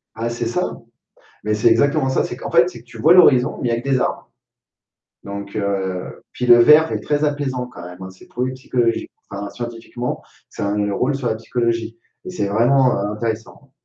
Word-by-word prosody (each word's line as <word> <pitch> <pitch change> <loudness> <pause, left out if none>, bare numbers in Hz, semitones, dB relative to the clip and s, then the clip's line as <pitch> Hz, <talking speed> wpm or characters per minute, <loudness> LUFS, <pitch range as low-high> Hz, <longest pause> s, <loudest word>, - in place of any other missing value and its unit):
Ah, 115 +1 -2
c'est 120 0 -3
ça. 180 +10 -2 0.7
Mais 105 0 0
c'est 105 +2 +3
exactement 135 +5 +2
ça, 130 - +1
c'est 120 - -5
qu'en - - -6
fait 125 0 +5
c'est 120 - -11
que - - -20
tu 120 - -13
vois 160 - +5
l'horizon, 135 -9 +5
mais 125 - -1
il - - 0
y - - +1
a 115 - -3
que 135 - -7
des 130 -2 +2
arbres. - - -2 0.9
Donc, 100 +1 -7
heu, 95 -3 -3
puis 125 - -4
le 120 -1 +7
vert 150 +6 +6
est - - -1
très 150 0 -1
apaisant 145 -4 -1
quand 120 -8 -12
même, 90 +1 -10
hein, 95 - -7
c'est 95 - -18
prouvé 125 +1 -3
psychologiqu 125 -3 -1 0.2
enfin 100 0 -5
scientifiquement, 120 +1 -5 0.3
ça - - -4
a - - 0
un 105 0 0
rôle 130 +7 0
sur 135 -3 -3
la - - +1
psychologie 115 0 -2 0.3
et - - -6
c'est 180 - -2
vraiment, 125 +5 +3
heu, 100 - -1
intéressant, 115 +5 -5
120 Hz, 215 wpm, -20 LUFS, 105-130 Hz, 0.9 s, le